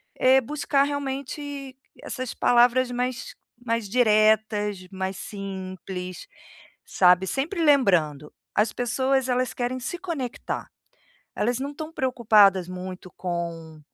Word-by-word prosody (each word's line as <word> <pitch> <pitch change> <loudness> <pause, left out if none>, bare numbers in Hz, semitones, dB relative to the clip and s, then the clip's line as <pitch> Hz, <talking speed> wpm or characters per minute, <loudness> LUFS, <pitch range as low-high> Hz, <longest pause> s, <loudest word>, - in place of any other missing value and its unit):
eh, 260 +1 +5
buscar 280 +1 +1
realmente 280 0 -4 0.3
essas 255 -2 -5
palavras 245 +1 +3
mais 250 - -3 0.3
mais 230 -3 -1
diretas, 215 -3 +2
mais 190 0 -3
simples, 185 -2 -7 0.6
sabe, 180 0 +4
sempre 330 - -1
lembrando, 175 - +3 0.3
as 215 +1 +2
pessoas 260 +2 0
elas 250 0 0
querem 250 +1 -2
se 265 +8 -4
conectar. 300 -10 -4 0.7
Elas 240 +3 0
não 275 +1 -3
estão 310 +2 -7
preocupadas 215 - +4
muito 185 0 -8
com 170 -3 -5
240 Hz, 110 wpm, -25 LUFS, 190-265 Hz, 0.7 s, eh